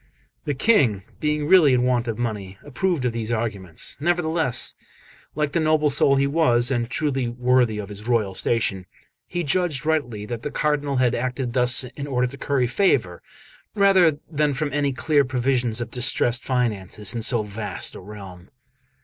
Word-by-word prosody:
The 145 - -2
King, 130 - +2 0.2
being 150 -1 -1
really 155 -6 +6
in 125 - +1
want 125 -1 +1
of 115 -2 -3
money, 105 -5 -4
approved 155 0 -1
of 125 - +1
these 115 -1 -4
arguments; 100 -7 -3
nevertheless, 160 -5 +1 0.6
like 150 -1 -1
the 170 - 0
noble 155 -2 +2
soul 140 0 +4
he 135 0 +2
was, 135 -5 +2
and 120 -2 -1
truly 135 -2 -1
worthy 125 -1 +1
of 105 -1 -6
his 105 +2 -9
royal 110 -5 +1
station, 95 -3 -1 0.4
he 175 0 -3
judged 155 -3 0
rightly 125 -10 -1
that 115 +1 -5
the 150 - -4
Cardinal 145 -2 -1
had 125 -2 +2
acted 125 0 -3
thus 125 0 +4
in 140 +3 -7
order 125 -2 0
to 130 +2 -6
curry 140 -3 0
favour 120 - +1 0.5
rather 190 -6 +4
than 150 -2 0
from 145 0 -3
any 145 -1 +1
clear 140 +3 +2
prevision 125 -1 0
of 120 - -5
distressed 120 0 +1
finances 110 -4 -1
in 115 - -3
so 115 0 +2
vast 105 0 -4
a - - -9
realm. 95 -3 -11
125 Hz, 170 wpm, -23 LUFS, 115-145 Hz, 0.6 s, really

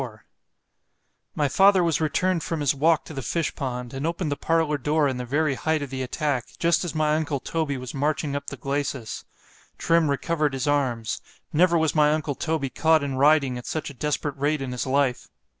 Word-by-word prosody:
LIV 115 -5 -7 1.2
MY 145 - +2
father 190 +5 +5
was 165 -2 +1
returned 170 +3 +1
from 165 +1 -3
his 145 -2 +2
walk 155 +3 +2
to - - -9
the 135 - -4
fish 165 +4 -1
pond——and 130 +1 -4
opened 170 -2 -2
the - - 0
parlour 155 0 +1
door 150 +2 +2
in 130 -2 -2
the 125 - -4
very 145 +3 +1
height 160 +2 -1
of 140 - -7
the 130 -1 -3
attack, 130 -1 -1
just 170 +1 +2
as 175 -2 -4
my 155 -1 +2
uncle 155 -3 -1
Toby 155 -1 -2
was 130 -1 -7
marching 145 +1 -1
up 140 0 -4
the 140 - -6
glacis——Trim 140 +4 -2
recovered 150 +1 0
his 135 +1 -2
arms——never 145 - 0
was 160 -2 +1
my 150 -1 +4
uncle 155 -2 -1
Toby 150 -2 -2
caught 160 -1 +3
in 140 -1 -2
riding 140 -3 +3
at 120 - -11
such 155 -2 -3
a - - -12
desperate 145 0 -2
rate 145 +2 +1
in 130 - -4
his 125 +2 -3
life! 135 -2 +1
145 Hz, 195 wpm, -25 LUFS, 135-160 Hz, 1.2 s, father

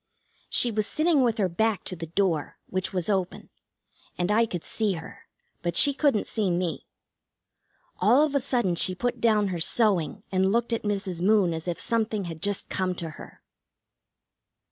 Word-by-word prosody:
She 240 - +3
was 215 -1 0
sitting 310 -2 +2
with 235 -2 +1
her 200 -4 +2
back 220 +4 0
to 185 - -5
the 165 -1 -7
door, 170 -3 -1
which 185 0 -3
was 180 -3 -2
open, 190 -3 -2 0.7
and 180 +3 0
I 225 +2 +3
could 175 -6 -5
see 215 -3 -1
her, 165 -2 -10 0.3
but 175 -1 -2
she 285 - +8
couldn't 275 -6 +1
see 210 -4 -1
me. 175 -1 -2 1.1
All 240 +10 +5
of 295 - -4
a 280 - +3
sudden 240 -8 0
she 180 +2 0
put 245 +6 -2
down 215 -3 +3
her 175 -2 -3
sewing 180 -3 +1
and 190 0 +2
looked 235 +1 0
at 230 - -1
Mrs. 195 -4 -3
Moon 195 -3 +3
as 160 +2 -5
if 175 - -3
something 220 -3 -1
had 165 -3 -7
just 205 +1 -2
come 185 -1 -1
to 165 -2 -5
her. - - -13
195 Hz, 180 wpm, -26 LUFS, 175-225 Hz, 1.1 s, she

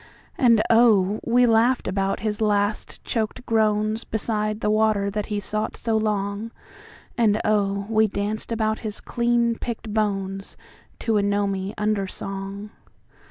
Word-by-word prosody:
And 230 -4 +4
oh, 215 -4 +4
we 245 +1 +4
laughed 235 +2 +3
about 195 0 -1
his 215 0 -2
last 205 0 0
choked 225 +2 -3
groansBeside 215 -1 0
the 210 - +1
water 215 -2 +2
that 210 0 -3
he 210 -2 -2
sought 215 +2 -2
so 225 -2 -1
long, 210 0 -1 0.7
And 215 -2 +3
oh, 200 -2 +1
we 220 0 +3
danced 205 +3 -3
about 220 -1 0
his 215 -2 -5
clean 235 -1 0
picked 225 -2 -5
bonesTo 200 +1 -3
a - - +2
gnomy 200 -1 -1
undersong. 200 0 -3
215 Hz, 125 wpm, -23 LUFS, 200-225 Hz, 0.7 s, And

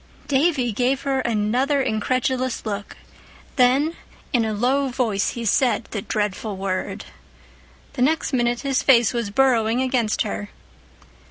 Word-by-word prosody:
_" - - -24
Davy 275 -3 +2
gave 255 +5 0
her 270 -1 0
another 240 +5 +1
incredulous 255 +1 -1
look, 205 -1 -5 0.6
then 275 +5 +3 0.4
in 240 -3 +3
a 220 - -1
low 255 +6 +1
voice 235 -6 -1
he 235 -1 -5
said 240 +2 +2
the 210 - -3
dreadful 210 0 -3
word. 190 -1 -3 0.9
The 255 - -4
next 300 +2 +1
minute 240 -1 +1
his 275 -2 0
face 240 -4 +4
was 235 -4 -2
burrowing 235 -1 +2
against 250 -4 +1
her. 100 +1 -5
245 Hz, 140 wpm, -22 LUFS, 215-265 Hz, 0.9 s, face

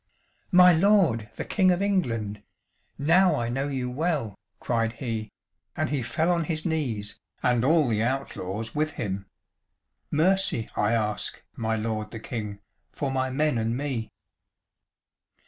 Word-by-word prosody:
"My 180 -1 +8
lord 165 - +3
the - - -4
King 190 -3 +3
of 180 -1 +3
England, 115 - -1 0.6
now 170 +4 +4
I 120 -4 -1
know 135 +4 -1
you 130 -3 -2
well," 135 - -1 0.3
cried 115 -2 0
he, 115 -3 -4 0.5
and - - 0
he 145 -3 0
fell 160 +8 0
on 170 -2 +1
his 155 -1 -3
knees 120 - -2 0.2
and 120 -1 +3
all 155 +1 +4
the 110 -2 +1
outlaws 115 -4 -3
with 155 0 0
him. 100 -2 -4 0.8
"Mercy 165 - +2
I 105 +2 +2
ask, 105 -2 -1
my 110 -1 -1
lord 110 -1 -2
the 115 - -7
King, 105 -3 -5 0.3
for 140 -2 -3
my 130 0 0
men 150 -1 +1
and 115 +2 -1
me." 130 -6 -3
125 Hz, 145 wpm, -26 LUFS, 110-160 Hz, 0.8 s, My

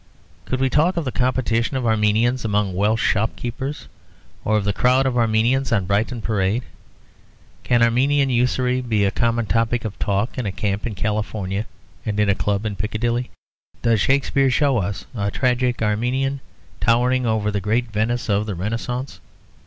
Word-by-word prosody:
Could 130 - -2
we 135 - +2
talk 160 +7 +2
of 165 - -1
the 130 - -2
competition 125 0 0
of 130 - -2
Armenians 110 +3 +2
among 105 -3 0
Welsh 105 +4 +1
shop 110 +1 +1
keepers, 135 +4 -5 0.6
or 110 0 +2
of 105 - 0
the 100 0 0
crowd 125 +6 +3
of 130 -2 0
Armenians 120 +3 +2
on 100 -5 +2
Brighton 110 +4 -1
Parade? 105 +2 0 1.0
Can 120 -1 +2
Armenian 135 +4 +3
usury 125 +1 +1
be 110 -5 +1
a 100 - +1
common 115 -1 0
topic 115 +2 0
of 105 - -5
talk 100 +6 -1
in 120 - -2
a - - -1
camp 100 +2 -2
in 110 - -5
California 105 0 -2 0.4
and 105 -1 -2
in 105 -1 +3
a - - +5
club 100 +1 -1
in 105 -2 -2
Piccadilly? 115 +5 -2 0.5
Does 115 -3 +3
Shakespeare 135 +1 +2
show 135 -1 +2
us 100 +1 -3
a 100 -4 -1
tragic 125 +1 0
Armenian 125 +6 0 0.4
towering 125 +2 +2
over 110 -1 0
the 100 -1 -2
great 115 +4 0
Venice 115 +3 -1
of 105 0 +1
the 100 - -3
Renascence? 115 +7 -4
115 Hz, 170 wpm, -21 LUFS, 105-125 Hz, 1.0 s, a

